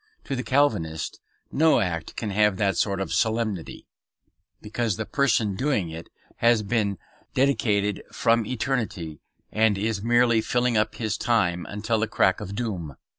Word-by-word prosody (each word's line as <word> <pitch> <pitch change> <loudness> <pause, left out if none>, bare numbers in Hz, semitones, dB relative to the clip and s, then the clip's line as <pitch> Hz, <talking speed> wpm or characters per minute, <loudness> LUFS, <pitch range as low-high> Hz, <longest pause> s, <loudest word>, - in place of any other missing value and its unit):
To 135 - -3
the 125 - -2
Calvinist 115 - 0 0.3
no 160 +2 +4
act 85 -3 -3
can 110 -3 -3
have 105 -1 +3
that 100 -1 +1
sort 100 -2 0
of 95 - -3
solemnity, 110 -6 -1 0.7
because 110 -1 -2
the 110 - -3
person 115 -7 +1
doing 105 - 0
it 80 +1 -8 0.3
has 115 -2 +3
been 100 -2 0 0.4
dedicated 105 -7 +1
from 115 -1 +2
eternity, 110 - -3 0.3
and 110 -2 +2
is 105 0 -1
merely 120 0 +3
filling 120 +1 +1
up 105 0 +1
his 110 -2 -2
time 90 -7 +1
until 110 +2 -1
the 110 - 0
crack 95 -2 +2
of 100 -1 -6
doom. 95 - -4
110 Hz, 150 wpm, -25 LUFS, 100-120 Hz, 0.7 s, no